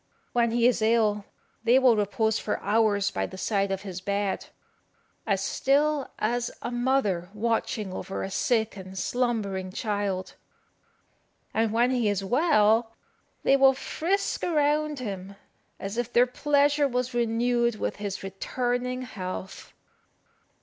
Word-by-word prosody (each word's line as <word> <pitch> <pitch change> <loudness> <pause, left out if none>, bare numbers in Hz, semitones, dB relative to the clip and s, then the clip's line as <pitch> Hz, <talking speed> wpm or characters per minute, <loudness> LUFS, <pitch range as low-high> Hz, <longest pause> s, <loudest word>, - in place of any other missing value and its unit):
When 235 -1 +3
he 235 +1 +2
is 245 -2 +3
ill 215 -2 +2 0.4
they 240 +2 +5
will 255 -3 +5
repose 220 +1 +1
for 210 - -2
hours 205 -2 +2
by 95 0 -2
the - - -10
side 200 +1 0
of 195 0 -3
his 185 -2 -6
bed, 200 0 -2 0.8
as 195 -2 +1
still 285 +5 +1
as 240 +2 0
a 240 - -3
mother 240 -8 0
watching 215 -3 -1
over 195 - -4
a 195 - -5
sick 220 +2 +1
and 190 -1 -9
slumbering 200 -5 -1
child; 200 -3 -2 1.2
and 225 -1 +1
when 240 +3 +3
he 240 -4 +1
is 200 -1 -1
well 225 - +3 0.5
they 275 - +5
will 270 -1 +5
frisk 370 +8 -1
around 300 -2 +1
him, 200 -5 -6 0.4
as 200 +4 -4
if 240 0 -2
their 240 +1 +5
pleasure 285 +2 +2
was 250 -1 -2
renewed 235 0 +1
with - - -3
his 200 -2 -5
returning 245 +6 -2
health. 190 -4 -7
225 Hz, 135 wpm, -27 LUFS, 200-250 Hz, 1.2 s, they